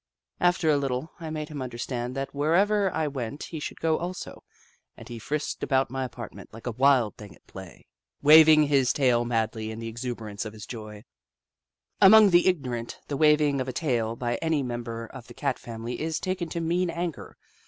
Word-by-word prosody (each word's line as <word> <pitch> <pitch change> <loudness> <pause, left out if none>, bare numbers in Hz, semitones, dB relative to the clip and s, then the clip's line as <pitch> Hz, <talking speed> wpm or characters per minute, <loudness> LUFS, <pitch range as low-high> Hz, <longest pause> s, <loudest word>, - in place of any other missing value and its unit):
After 175 -2 +2
a 145 - +3
little, 135 +2 -2
I 165 -1 -6
made 155 0 -5
him 150 -3 -6
understand 125 0 -4
that 135 0 -4
wherever 190 +7 +2
I 160 -1 -1
went 140 0 -5
he 160 - -6
should - - -6
go 160 -1 +1
also, 180 +1 -6 0.5
and - - -12
he 120 -1 -7
frisked 150 +6 -3
about 135 -2 +1
my 135 0 -2
apartment 130 - -9
like 115 +1 -12
a 120 - -1
wild 130 -2 +3
thing 100 -5 -11
at - - -27
play, 95 - -9
4 - - -10
The - - -15
Book - - -23
of - - -25
Clever 60 0 -57
Beasts - - -24
waving 155 0 +8
his 135 -3 +3
tail 125 -4 +2
madly 110 -2 -1
in 110 - -6
the 115 0 -6
exuberance 115 -3 -5
of 110 -1 -7
his 105 -1 -9
joy 110 -3 -9 1.0
Among 210 +1 +8
the 175 +1 +5
ignorant, 125 -10 -2
the 140 - -2
waving 150 -2 +3
of 130 - -4
a 130 - -4
tail 120 -6 -1
by 120 0 -2
any 160 -3 0
member 120 -2 -5
of 125 +1 -12
the 120 - -13
Cat 125 - -2
family 115 +2 -6
is 160 0 -2
taken 185 -3 -3
to 170 - -3
mean 170 +2 0
anger. 170 -2 -5
135 Hz, 215 wpm, -26 LUFS, 115-160 Hz, 1.0 s, waving